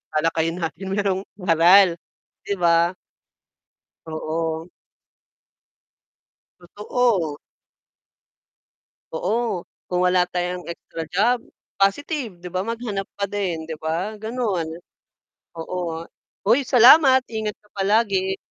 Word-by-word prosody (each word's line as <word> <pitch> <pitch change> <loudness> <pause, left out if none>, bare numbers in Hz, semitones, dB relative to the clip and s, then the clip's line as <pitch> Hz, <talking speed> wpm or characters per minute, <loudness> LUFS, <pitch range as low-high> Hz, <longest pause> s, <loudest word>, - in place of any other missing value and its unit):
talakayan 165 +1 +1
natin 165 +4 -4
mayrong 195 -1 0 0.2
aral, 175 +1 +5 0.5
'di 200 - 0
ba? 170 0 +3 1.1
Oo. 160 +1 -3 2.1
Totoo. 205 -8 +1 1.8
Oo, 210 +2 -1 0.2
kung 180 0 +2
wala 180 0 +4
tayong 180 0 -2
extra 165 -1 -7
job, 235 +7 +2 0.4
positive 220 - -1
'di 180 - -11
ba? 185 +1 -2
Maghanap 220 -3 -4
pa 200 - 0
din 185 -6 -3
'di 160 - -5
ba, 170 +7 -2
gano'n. 215 -6 -2 0.9
Oo 165 +2 -6 0.2
nga, 160 0 -5 0.4
hoy! 240 +7 +4
Salamat, 260 +1 +7
ingat 220 -2 -4
ka 210 - -29
palagi. 195 -1 +1
190 Hz, 95 wpm, -22 LUFS, 170-215 Hz, 2.1 s, Salamat